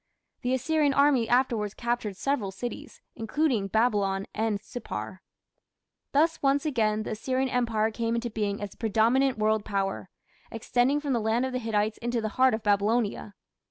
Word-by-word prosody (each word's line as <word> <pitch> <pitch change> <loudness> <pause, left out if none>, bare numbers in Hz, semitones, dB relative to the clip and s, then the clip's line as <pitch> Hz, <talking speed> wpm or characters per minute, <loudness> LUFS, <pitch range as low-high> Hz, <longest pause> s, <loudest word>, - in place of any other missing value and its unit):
The 250 +1 +1
Assyrian 290 +1 +1
army 280 -5 +3
afterwards 235 -5 +1
captured 235 -5 -2
several 275 -7 -1
cities, 230 +6 -7
including 225 -2 0
Babylon 200 -3 +1
and 220 -2 -1
Sippar. 240 +4 -7 0.9
Thus 320 +4 +2
once 280 +2 +2
again 215 -7 +1
the - - -5
Assyrian 260 +4 -1
Empire 230 -3 +1
came 230 +1 -1
into 235 0 -2
being 205 -1 -2
as 200 - -5
the - - -17
predominant 235 +4 +2
world 215 0 +1
Power, 195 -2 -2 0.4
extending 245 +5 +1
from 285 -2 -1
the 235 - +1
land 225 +4 +1
of 260 - -3
the 255 - -1
Hittites 215 -2 -1
into 240 0 -1
the 220 -1 -2
heart 260 +1 +3
of 220 - -7
Babylonia. 205 0 0
230 Hz, 160 wpm, -27 LUFS, 215-260 Hz, 0.9 s, army